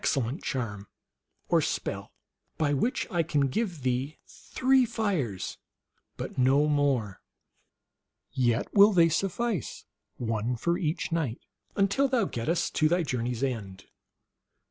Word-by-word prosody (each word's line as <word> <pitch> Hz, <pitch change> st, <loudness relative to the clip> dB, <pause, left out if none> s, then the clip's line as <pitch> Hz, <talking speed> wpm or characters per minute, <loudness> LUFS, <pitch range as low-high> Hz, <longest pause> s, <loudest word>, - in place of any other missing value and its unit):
cellent 135 Hz, +3 st, 0 dB
charm, 105 Hz, -6 st, -4 dB, 0.6 s
or -, -, +3 dB
spell, -, -, -3 dB, 0.5 s
by 145 Hz, -2 st, +1 dB
which 240 Hz, -, 0 dB
I 175 Hz, -, +2 dB
can 145 Hz, -4 st, +1 dB
give 175 Hz, -, -2 dB
thee 130 Hz, +4 st, -1 dB
three 260 Hz, 0 st, +1 dB
fires, 200 Hz, -, -2 dB, 0.6 s
but -, -, -5 dB
no 135 Hz, +3 st, +4 dB
more; 140 Hz, -9 st, 0 dB, 1.1 s
yet 120 Hz, -2 st, 0 dB
will 205 Hz, +1 st, +7 dB
they 170 Hz, -2 st, +5 dB
suffice, 195 Hz, -, -2 dB, 0.3 s
one 115 Hz, +1 st, -1 dB
for 170 Hz, +9 st, 0 dB
each 165 Hz, 0 st, -2 dB
night, 150 Hz, -9 st, -1 dB, 0.4 s
until 200 Hz, +8 st, +2 dB
thou 250 Hz, -6 st, +1 dB
gettest 165 Hz, +5 st, -1 dB
to 155 Hz, -, +4 dB
thy 175 Hz, +1 st, +2 dB
journey 125 Hz, -4 st, -2 dB
s 120 Hz, -, -4 dB
end. 100 Hz, -8 st, -4 dB
145 Hz, 125 wpm, -28 LUFS, 125-180 Hz, 1.1 s, will